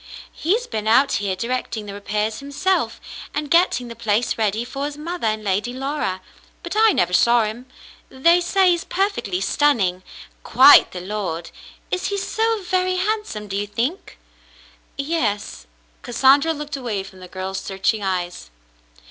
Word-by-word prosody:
"He's 435 +9 0
been 215 - -4
out 250 +5 +4
here 200 -2 -1
directing 235 0 -3
the 200 - -7
repairs 210 +2 -2
himself, 285 +7 -1 0.4
and 295 -1 -3
getting 335 -8 +3
the 235 - -8
place 225 0 0
ready 220 +1 -1
for 275 +3 -4
his 290 0 -5
mother 335 -3 -3
and 215 0 -1
Lady 205 +4 -1
Laura; 265 -8 -3 0.4
but - - -5
I 440 0 +5
never 180 - +1
saw 235 +4 +4
him. 225 +4 -5 0.4
They 335 +7 +3
say 370 +1 +3
he's 345 -1 0
perfectly 380 - -1
stunning. 195 -6 +1 0.4
Quite 265 +5 +7
the 180 - -6
lord. 180 -4 -4 0.4
Is 365 - -1
he 400 - -2
so 445 +1 -1
very 370 0 0
handsome, 370 - -2
do 195 - -5
you 205 +1 -2
think? 245 - -3 0.4
" - - -28
"Yes." 260 - -2 0.3
Cassandra 275 +6 +4
looked 300 -1 -5
away 230 -7 -3
from 190 -1 -14
the 185 - -10
girl's 190 +1 -5
search 195 +2 -1
ing 215 - -6
eyes. 180 - -3
235 Hz, 160 wpm, -21 LUFS, 200-325 Hz, 0.4 s, Quite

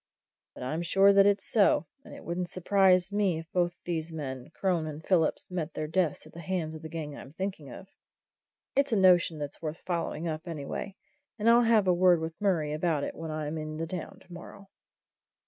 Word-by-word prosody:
But - - -8
I'm 155 +6 -2
sure 195 +3 +5
that 200 0 +6
it 200 -1 +4
is - - -11
so, 200 -7 +3 0.2
and - - -11
it - - -11
wouldn't 175 +1 -3
surprise 185 0 +3
me 200 -5 +1
if 165 0 -9
both 175 -1 +1
these 165 -1 -3
men, 135 -5 -6
Crone 170 -2 -1
and 155 +1 -8
Phillips, 175 -1 +1
met 165 -3 -4
their 155 - -2
deaths 160 -1 -1
at 155 - -15
the 170 - -9
hands 170 -2 -3
of 155 - -9
the 160 - -8
gang 155 -3 -5
I'm 140 - -11
thinking 185 -6 -5
of. 185 - -10 0.9
It's 280 0 +2
a - - +3
notion 180 -4 +4
that's 145 -1 -6
worth 155 0 -5
following 170 -2 -2
up, 160 +2 -4
anyway, 165 +5 -5 0.4
and 220 0 -1
I'll 235 +1 +7
have 225 -3 +4
a 180 - +5
word 175 -1 +4
with 160 +4 -6
Murray 165 -7 +1
about 155 -2 0
it - - -3
when 165 0 -7
I'm 155 0 -3
in 155 0 -5
the 165 - -2
town 170 0 -6
tomorrow." 180 +3 -12
170 Hz, 210 wpm, -29 LUFS, 155-185 Hz, 0.9 s, I'll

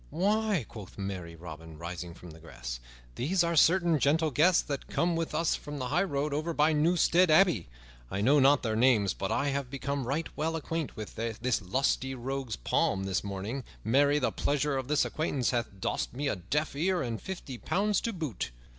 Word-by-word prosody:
"Why," 200 - +1
quoth 105 -5 -11
merry 95 -4 -5
Robin, 80 -1 -10
rising 85 +1 -6
from 90 -1 -11
the 80 - -13
grass, - - -7 0.3
"these 175 - +1
are 170 0 0
certain 170 0 +4
gentle 155 +3 +2
guests 160 +6 +4
that 140 -2 -5
came 170 0 +1
with 165 -2 -2
us 165 +1 +2
from 145 0 -5
the 130 -2 -3
highroad 150 -3 0
over 155 +3 -1
by 150 +2 +4
Newstead 170 +3 +4
Abbey. 155 - +4 0.4
I 95 - -3
know 135 +8 +4
not 140 +2 +5
their 110 -2 0
names, 110 -5 +4
but 95 - -3
I 140 0 +1
have 140 -2 -2
become 140 -1 -3
right 150 +5 -1
well 160 +2 -1
acquaint 160 -1 -3
with 110 -1 -6
this 115 +2 -1
lusty 130 +6 0
rogue's 130 -2 -3
palm 95 +9 0
this 95 -1 -1
morning. 100 +7 -4 0.2
Marry, 140 +5 +4
the 140 - +1
pleasure 145 0 0
of 130 -1 -2
this 150 +1 +2
acquaintance 145 -5 -1
hath 120 -1 0
dost 95 - -2
me 145 +2 -1
a - - 0
deaf 140 - -2
ear 180 +4 +1
and 115 -3 -4
fifty 145 -10 -6
pounds 205 0 +1
to 230 - -1
boot!" 155 - -4
140 Hz, 190 wpm, -30 LUFS, 110-160 Hz, 0.4 s, not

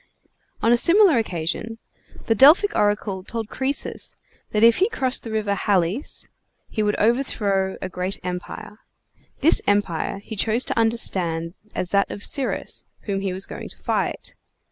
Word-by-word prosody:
On 230 - +4
a 240 - +5
similar 345 - +5
occasion, 210 +3 -3 0.5
the 225 - +3
Delphic 310 - +6
oracle 205 -2 0
told 225 +2 -5
Croesus 270 +2 -2 0.3
that 215 +1 +1
if 230 0 +7
he 390 +4 +3
crossed 265 - -1
the 230 - -8
River 215 -2 -1
Halys 195 - 0 0.4
he 215 - -2
would 210 0 +1
overthrow 205 -5 0
a - - -2
great 185 +1 -3
empire. 180 +3 -6 0.6
This 310 +4 +5
empire 200 -4 0
he 220 - -7
chose 225 +4 0
to - - -1
understand 175 -8 0 0.2
as 180 - -2
that 200 0 +2
of 205 - -7
Cyrus, 275 -2 -2 0.2
whom 195 -2 -3
he 195 -1 -2
was 190 +2 0
going - - -8
to - - -8
fight. - - -2
210 Hz, 155 wpm, -23 LUFS, 190-235 Hz, 0.6 s, if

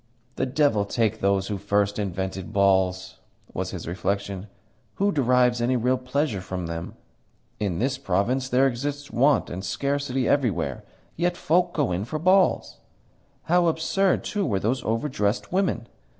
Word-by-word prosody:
"The 130 - -1
devil 130 -6 +2
take 110 +1 0
those 100 -1 +1
who 100 -1 -3
first 100 +1 0
invented 95 -1 -3
balls!" 95 -1 +1 0.3
was - - -3
his - - -7
reflection. 100 +2 -3 0.5
"Who 200 +1 +2
derives 125 -4 +3
any 125 +2 +2
real 125 +2 +1
pleasure 125 -4 -1
from 95 -1 -5
them? 85 0 -5 0.6
In 100 -5 -1
this 130 +3 -1
province 125 +6 0
there 130 +2 +4
exist 140 +3 -2
want 135 +2 +3
and 95 +2 -5
scarcity 140 +5 -1
everywhere: 115 - 0 0.3
yet 175 +1 0
folk 175 +2 +2
go 145 - +1
in 90 +3 -1
for 155 +6 -3
balls! 185 +4 +2 0.6
How 175 +1 +3
absurd, 175 +4 +1
too, 205 -1 -2
were 100 - 0
those 120 +5 -1
overdressed 115 -2 -1
women! 185 - 0
120 Hz, 150 wpm, -25 LUFS, 100-140 Hz, 0.6 s, there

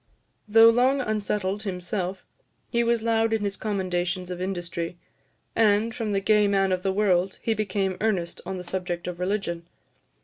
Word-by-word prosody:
Though 225 +2 +8
long 255 +4 +3
unsettled 210 -4 -1
himself, 185 -1 -3 0.5
he 235 -1 +2
was 235 -1 +1
loud 225 0 +2
in 220 -2 0
his 200 -1 -1
commendations 185 -3 -2
of 180 0 -5
industry; 175 -2 -3 0.6
and, 220 +1 +3
from 220 -2 -3
the 200 - +1
gay 210 +1 +3
man 195 -1 +2
of 185 -1 0
the 195 0 0
world, 190 -2 +1
he 225 - +1
became 195 -3 -1
earnest 190 -6 -1
on 190 - -5
the 180 - -6
subject 180 -1 -3
of 180 -1 -5
religion. 180 -3 -2
195 Hz, 165 wpm, -25 LUFS, 180-215 Hz, 0.6 s, Though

